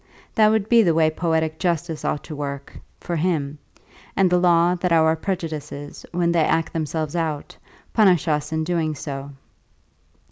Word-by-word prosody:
That 215 Hz, -1 st, +5 dB
would 215 Hz, -2 st, +1 dB
be 235 Hz, 0 st, +6 dB
the 170 Hz, -6 st, +2 dB
way 160 Hz, -1 st, +3 dB
poetic 160 Hz, -1 st, -1 dB
justice 170 Hz, -3 st, -1 dB
ought 145 Hz, -, -2 dB
to 155 Hz, -, -8 dB
work, 140 Hz, -1 st, -6 dB, 0.2 s
for 175 Hz, -, -4 dB
him 150 Hz, -4 st, -1 dB, 0.6 s
and 190 Hz, -2 st, +3 dB
the 180 Hz, -, +4 dB
law 175 Hz, 0 st, +4 dB
that 180 Hz, 0 st, -2 dB
our 160 Hz, -1 st, +4 dB
prejudices, 155 Hz, -5 st, -5 dB
when 170 Hz, -1 st, +1 dB
they 170 Hz, -1 st, +2 dB
act 165 Hz, +1 st, 0 dB
themselves 155 Hz, -1 st, -3 dB
out, 160 Hz, -3 st, -3 dB, 0.4 s
punish 185 Hz, -7 st, +4 dB
us 150 Hz, -1 st, 0 dB
in 160 Hz, 0 st, -1 dB
doing 160 Hz, -2 st, -1 dB
so. 140 Hz, -1 st, -6 dB
160 Hz, 165 wpm, -22 LUFS, 150-175 Hz, 0.6 s, be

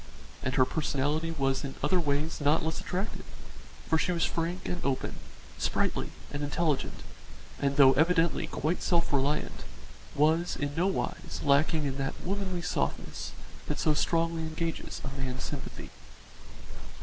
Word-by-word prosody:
And 130 Hz, 0 st, -1 dB
her 130 Hz, -, +6 dB
personality 150 Hz, +2 st, 0 dB
was 135 Hz, -4 st, 0 dB
in 135 Hz, -1 st, -4 dB
other 185 Hz, -, +4 dB
ways 150 Hz, 0 st, 0 dB
not 150 Hz, +2 st, +3 dB
less 160 Hz, -, -1 dB
attractive, 190 Hz, +4 st, -3 dB, 0.6 s
for 160 Hz, -, +3 dB
she 180 Hz, -, +1 dB
was 170 Hz, -1 st, +2 dB
frank 170 Hz, +2 st, -2 dB
and 180 Hz, -, -3 dB
open, 135 Hz, -2 st, -1 dB, 0.4 s
sprightly -, -, 0 dB, 0.2 s
and 145 Hz, -, -3 dB
intelligent, 145 Hz, 0 st, 0 dB, 0.6 s
and 140 Hz, 0 st, +1 dB
though 135 Hz, -2 st, +8 dB
evidently 165 Hz, +3 st, +3 dB
quite 160 Hz, +4 st, -1 dB
self 170 Hz, -4 st, +2 dB
reliant, 140 Hz, +2 st, 0 dB, 0.5 s
was 160 Hz, +4 st, +3 dB
in 145 Hz, 0 st, -2 dB
nowise 185 Hz, +5 st, -1 dB
lacking 150 Hz, +2 st, +3 dB
in 135 Hz, -1 st, -2 dB
that 135 Hz, 0 st, -2 dB
womanly 185 Hz, -2 st, -2 dB
softness -, -, -2 dB, 0.3 s
that -, -, -1 dB
so 155 Hz, -, +3 dB
strongly 165 Hz, +2 st, +1 dB
engages 160 Hz, +1 st, -3 dB
a 140 Hz, 0 st, -5 dB
man's 130 Hz, 0 st, -3 dB
sympathy. 140 Hz, -3 st, -6 dB
155 Hz, 140 wpm, -30 LUFS, 140-170 Hz, 0.6 s, though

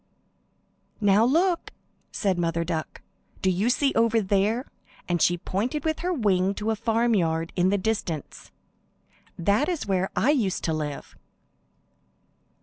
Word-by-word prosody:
"Now 205 Hz, 0 st, +4 dB
look!" 335 Hz, +8 st, +2 dB, 0.4 s
said 190 Hz, -4 st, 0 dB
Mother 170 Hz, -1 st, 0 dB
Duck. 165 Hz, -2 st, -4 dB, 0.4 s
"Do 190 Hz, -, +3 dB
you 195 Hz, +6 st, +1 dB
see 275 Hz, +2 st, +2 dB
over 230 Hz, 0 st, +3 dB
there?" 210 Hz, +5 st, +1 dB, 0.4 s
and 175 Hz, -2 st, 0 dB
she 175 Hz, -, +3 dB
pointed 235 Hz, -, -3 dB
with 315 Hz, -1 st, 0 dB
her 360 Hz, +2 st, -1 dB
wing 200 Hz, -, +1 dB
to 215 Hz, +2 st, -1 dB
a -, -, 0 dB
farmyard 210 Hz, -8 st, 0 dB
in 180 Hz, 0 st, +3 dB
the 205 Hz, -, +2 dB
distance. 185 Hz, -7 st, -3 dB, 0.9 s
"That 205 Hz, -, +1 dB
is 345 Hz, -4 st, -2 dB
where 190 Hz, -1 st, 0 dB
I 285 Hz, -, +3 dB
used 225 Hz, -11 st, 0 dB
to 160 Hz, -, 0 dB
live." 150 Hz, -2 st, -5 dB
200 Hz, 140 wpm, -25 LUFS, 175-235 Hz, 0.9 s, Now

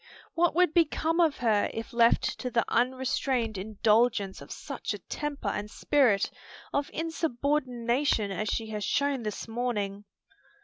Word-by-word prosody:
What 340 Hz, 0 st, +2 dB
would 360 Hz, -2 st, +4 dB
become 330 Hz, 0 st, +2 dB
of 325 Hz, -4 st, +3 dB
her 220 Hz, -4 st, +2 dB
if 225 Hz, +1 st, -6 dB
left 235 Hz, 0 st, +4 dB, 0.2 s
to 250 Hz, -, -3 dB
the 235 Hz, -2 st, +1 dB
unrestrained 255 Hz, -2 st, 0 dB
indulgence 210 Hz, 0 st, +1 dB
of -, -, -11 dB
such -, -, -5 dB
a -, -, -6 dB
temper 295 Hz, -1 st, -4 dB
and 205 Hz, 0 st, -3 dB
spirit 235 Hz, -6 st, +2 dB, 0.4 s
of 285 Hz, 0 st, 0 dB
insubordination 270 Hz, -7 st, 0 dB
as 210 Hz, +2 st, -2 dB
she 220 Hz, -1 st, -2 dB
has 210 Hz, -1 st, -3 dB
shown 280 Hz, +3 st, +1 dB
this 210 Hz, 0 st, -5 dB
morning?" 210 Hz, -4 st, -2 dB
240 Hz, 140 wpm, -28 LUFS, 215-285 Hz, 0.4 s, would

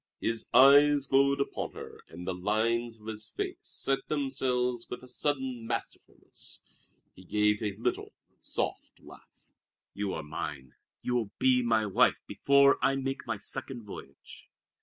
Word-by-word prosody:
His 115 Hz, -1 st, -2 dB
eyes 140 Hz, +2 st, +7 dB
glowed 140 Hz, +1 st, +3 dB
upon 140 Hz, -, -3 dB
her, -, -, -10 dB
and 90 Hz, +2 st, -9 dB
the 95 Hz, -, -1 dB
lines 115 Hz, +5 st, 0 dB
of 105 Hz, -, -17 dB
his 110 Hz, -1 st, -6 dB
face -, -, -4 dB
set 135 Hz, 0 st, -3 dB
themselves 125 Hz, -4 st, -1 dB
with 125 Hz, -, -6 dB
a -, -, -11 dB
sudden 130 Hz, -3 st, -2 dB
masterfulness. -, -, -6 dB, 0.5 s
He 95 Hz, -, -15 dB
gave 105 Hz, +2 st, +1 dB
a 105 Hz, -3 st, -2 dB
little, 120 Hz, +2 st, -2 dB, 0.2 s
soft -, -, -4 dB
laugh. -, -, -17 dB, 0.4 s
"You 100 Hz, -1 st, -2 dB
are 80 Hz, -, -5 dB
mine! 70 Hz, -3 st, -6 dB, 0.3 s
You 125 Hz, -, -1 dB
will 115 Hz, -5 st, 0 dB
be 130 Hz, -1 st, +4 dB
my 115 Hz, -2 st, +2 dB
wife 100 Hz, -, +3 dB
before 140 Hz, 0 st, +4 dB
I 135 Hz, -, +3 dB
make 135 Hz, 0 st, -3 dB
my 110 Hz, -, -1 dB
second 130 Hz, +3 st, -4 dB
voyage." 70 Hz, -9 st, -11 dB
120 Hz, 150 wpm, -30 LUFS, 105-135 Hz, 0.5 s, eyes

